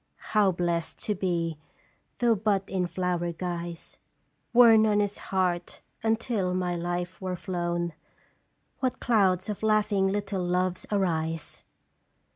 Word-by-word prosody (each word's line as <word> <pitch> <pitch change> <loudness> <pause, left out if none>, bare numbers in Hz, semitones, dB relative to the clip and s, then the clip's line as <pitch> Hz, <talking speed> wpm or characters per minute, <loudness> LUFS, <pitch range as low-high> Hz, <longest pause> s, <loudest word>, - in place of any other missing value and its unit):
" - - -47 0.2
How 210 -3 +5
blest 170 -1 -2
to 210 - 0
be, 170 -5 -1 0.6
though 240 -1 +4
but 200 -2 0
in 185 -2 -1
flower 175 -1 -1
guise, 170 -1 -6 0.5
Worn 225 -2 +7
on 210 -1 +3
his 205 -1 -1
heart 180 -2 -1 0.2
until 220 -4 0
my 180 -1 -1
life 175 +2 -3
were 185 -1 -2
flown! 175 -2 -2 0.9
What 255 -2 -1
clouds 190 -6 +2
of 210 -2 -4
laughing 210 -2 +2
little 195 -1 -1
Loves 180 0 -1
arise 165 -5 -1
185 Hz, 125 wpm, -27 LUFS, 175-205 Hz, 0.9 s, Worn